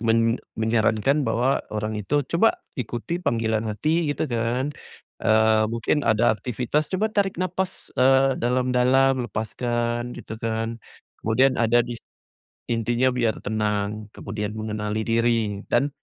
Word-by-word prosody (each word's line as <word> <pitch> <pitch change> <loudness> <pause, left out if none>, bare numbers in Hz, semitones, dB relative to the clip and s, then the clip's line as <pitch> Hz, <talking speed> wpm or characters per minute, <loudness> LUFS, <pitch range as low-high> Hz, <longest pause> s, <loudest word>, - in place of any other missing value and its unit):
men 115 0 +3 0.4
menyarankan 110 +5 +2
bahwa, 120 +1 +1
orang 110 0 -3
itu, 145 +8 0
coba 225 - +2 0.2
ikuti 125 +9 -4
panggilan 110 -5 0
hati, 155 +9 0
gitu 145 - -1
kan. 125 +2 -1 0.5
Eee, 110 0 +4
mungkin 115 +6 0
ada 115 -2 +3
aktivitas 125 +6 -2
coba 215 +3 -1
tarik 200 -2 +1
nafas, 185 +1 -3
eee, 135 +1 +3
dalam-dalam, 125 +1 +2
lepaskan, 120 +2 -2
gitu 110 +1 -8
kan. 115 0 -2 0.4
Kemudian 130 +4 +2
ada 120 +1 +4
di 120 - -6 0.8
intinya 120 +2 +1
biar 120 -3 0
tenang. 105 0 -2
Kemudian 105 +1 -4
mengenali 110 0 -3
diri. 115 -3 +1
Dan 135 +4 +1
120 Hz, 125 wpm, -24 LUFS, 110-130 Hz, 0.8 s, Eee